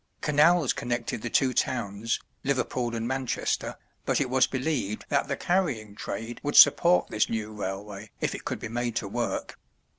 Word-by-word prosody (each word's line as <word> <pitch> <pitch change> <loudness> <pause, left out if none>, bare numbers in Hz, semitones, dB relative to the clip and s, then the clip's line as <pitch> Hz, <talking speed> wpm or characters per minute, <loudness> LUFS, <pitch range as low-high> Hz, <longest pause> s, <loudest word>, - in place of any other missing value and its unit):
Canals 150 0 +4
connected 120 -2 -3
the 120 - -3
two 130 +2 +2
towns, 115 -4 -1 0.2
Liverpool 130 -3 -1
and 115 0 -2
Manchester, 130 -1 -2 0.3
but - - +1
it 130 -3 -1
was 130 0 +4
believed 130 -6 -2
that 140 -1 +1
the 140 - -2
carrying 145 - 0
trade 115 +2 -6
would 145 0 -2
support 175 +1 +7
this 105 - +1
new 110 -1 -3
railway 100 +1 -6
if - - -1
it - - -7
could - - -3
be - - -6
made 120 +1 -2
to - - -2
work. - - -3
120 Hz, 170 wpm, -27 LUFS, 110-140 Hz, 0.3 s, support